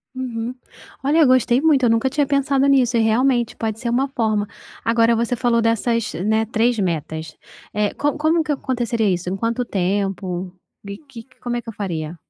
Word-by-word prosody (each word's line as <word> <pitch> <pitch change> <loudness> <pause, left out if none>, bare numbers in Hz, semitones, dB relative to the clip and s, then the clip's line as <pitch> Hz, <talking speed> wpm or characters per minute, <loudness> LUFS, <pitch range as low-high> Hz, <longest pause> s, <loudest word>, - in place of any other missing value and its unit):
Uhum. 245 -2 -4 0.5
Olha 295 +4 +3
eu 310 - +6
gostei 255 -1 +4
muito. 290 -3 +3
Eu 240 - +4
nunca 230 +3 +2
tinha 290 +2 +1
pensado 275 0 +2
nisso 260 -3 +3
e - - +3
realmente 240 +2 +2
pode 220 -1 -3
ser 240 - -3
uma 255 +4 +1
forma. 220 -6 -1 0.4
Agora 230 0 +3
você 235 +2 0
falou 240 -1 +1
dessas, 230 0 0
né, 220 +5 0
3 230 +2 +1
metas. 160 -4 -3 0.4
Eh, 210 0 0
co 290 0 0
como 315 +2 +2
que 305 - -2
aconteceria 240 -5 -1
isso? 180 -1 -1
Em 190 - -2
quanto 230 +4 -1
tempo? 190 -2 -2 0.3
E 200 0 -6
que 270 -6 -12
que 260 - -29
como 240 -1 -3
é - - -3
que - - -8
eu - - -7
faria? 170 -6 -4
230 Hz, 195 wpm, -21 LUFS, 205-260 Hz, 0.5 s, eu